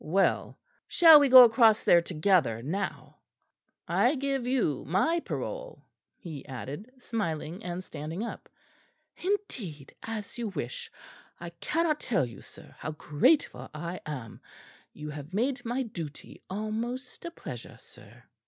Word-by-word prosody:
"Well, 190 +5 +1 0.3
shall 325 -3 +9
we 285 -1 +3
go 255 0 +12
across 225 -2 +5
there 170 - +6
together 165 - +1
now? 190 +8 -4 0.7
I - - +3
give 270 -2 -1
you 240 - +1
my 255 - +2
parole," - - -6 0.3
he 155 -6 -8
added, 140 - -7
smiling, 190 -6 -4
and 180 +1 -4
standing 160 +5 -5
up. 235 - -7 0.7
"Indeed, 245 - -3
as 225 0 -6
you 235 - -2
wish. 145 - -5 0.5
I 170 0 -7
cannot 305 - 0
tell 190 - +1
you, 115 -5 -10
sir, - - -14
how 155 - -4
grateful 150 - +1
I 170 +4 -5
am. 130 -7 -7 0.5
You 150 0 -7
have 150 +4 -8
made 250 +3 0
my 245 +2 -1
duty 165 - -8
almost 225 +6 -4
a 340 - -4
pleasure, 340 - -9
sir." - - -17
200 Hz, 135 wpm, -29 LUFS, 155-255 Hz, 0.7 s, go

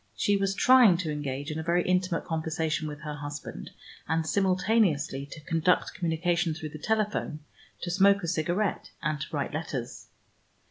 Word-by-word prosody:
She 205 - +2
was 195 0 0
trying 245 -6 +6
to 165 -3 -2
engage 145 0 -4
in 155 - -3
a - - -3
very 170 +2 +2
intimate 180 -1 0
conversation 160 -1 -1
with 150 -1 -7
her 150 -1 -5
husband, 145 0 -7 0.4
and 160 0 0
simultaneously 185 -7 +1
to 155 - -10
conduct 165 +4 +1
communication 170 0 0
through 155 -1 -6
the 155 0 -9
telephone, 210 -6 -1 0.4
to 175 - -3
smoke 200 +1 +4
a - - -2
cigarette, 175 +4 -1
and 150 -1 -1
to - - -3
write 145 -1 -2
letters. 145 -6 -5
165 Hz, 165 wpm, -28 LUFS, 150-185 Hz, 0.4 s, trying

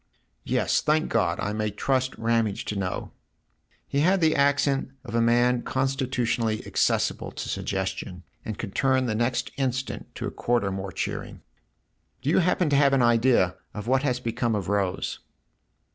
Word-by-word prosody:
"Yes, - - +1
thank 155 +1 +1
God, 85 -1 +1
I 105 - -2
may 110 0 -1
trust 130 +5 -1
Ramage 115 -3 0
to 105 - -3
know! 95 -2 -3 0.4
" - - -41
He 140 - -1
had 185 +6 +4
the 160 -2 +3
accent 140 -1 +2
of 125 - -8
a 115 - +2
man 120 +1 +3
constitu 135 +1 -1 0.2
tionally 115 -2 0
accessible - - 0
to - - -5
suggestion, 90 -1 -3 0.2
and 110 -2 -5
could 100 -4 -6
turn 130 -1 +2
the 115 - 0
next 120 +3 0
instant 130 -1 -3
to - - -4
a - - -3
quarter 115 -5 0
more 95 0 -4
cheering. - - -4 0.4
" - - -46
Do 140 - +1
you - - +4
happen 180 -1 +2
to - - +4
have 140 -1 +4
an 135 -2 +4
idea 115 -6 +3 0.2
of 105 -1 -5
what 130 +2 +2
has 125 -3 0
become 115 -1 -1
of 100 -3 -3
Rose 100 -3 -1
120 Hz, 175 wpm, -26 LUFS, 105-135 Hz, 0.4 s, had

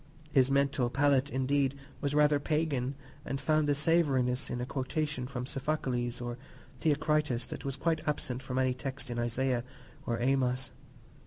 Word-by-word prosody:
His 130 -2 +4
mental 140 -2 +2
palate, 140 +1 +3
indeed, 135 0 +1 0.3
was 145 0 0
rather 150 -1 +5
pagan, 145 -4 0 0.3
and 135 - -3
found 155 -1 +2
a 145 - +3
savouriness 140 -5 +2
in 125 - -2
a 125 - -2
quotation 135 +1 -2
from 125 -2 -4
Sophocles 130 -3 -2
or 120 0 -5 0.4
Theocritus 150 -5 +1
that - - -7
was 135 -1 -2
quite 160 +2 +1
absent 130 -4 -1
from 130 -1 -4
any 130 -1 +3
text 130 +1 -5
in 120 - -2
Isaiah 120 +1 0 0.4
or 115 -1 0
Amos. 130 0 +1
135 Hz, 155 wpm, -31 LUFS, 125-145 Hz, 0.4 s, rather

